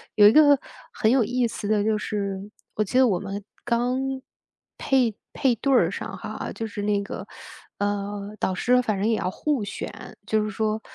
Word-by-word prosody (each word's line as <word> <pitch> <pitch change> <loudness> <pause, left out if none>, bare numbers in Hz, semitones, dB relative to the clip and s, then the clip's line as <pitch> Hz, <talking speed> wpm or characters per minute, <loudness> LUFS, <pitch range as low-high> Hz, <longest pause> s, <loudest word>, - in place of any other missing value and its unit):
有 205 -1 +8
一 - - +8
个 290 -1 +6 0.3
很 220 - +2
有 255 -2 +4
意 245 +1 +1
思 210 -2 -5
的 210 -1 +2
就 220 0 +2
是， 200 -1 -3 0.3
我 215 - +2
记 210 - -1
得 260 -1 +6
我 185 -5 +1
们 200 0 -5 0.2
刚 240 +2 +1 0.8
配 255 -5 +2 0.2
配 260 -3 +2
对 275 +5 -1
儿 - - +4
上 - - -5
哈， - - -5
就 225 - -3
是 205 -1 -6
那 205 -1 +1
个， - - -7 0.5
嗯， 205 0 -2
导 190 - 0
师 250 +5 +3
反 215 -4 -1
正 210 - +1
也 225 - +2
要 185 - -1
互 285 -4 -1
选， 205 - -7
就 215 -1 +2
是 215 - -2
说 215 +1 -1
215 Hz, 210 characters per minute, -25 LUFS, 205-245 Hz, 0.8 s, 有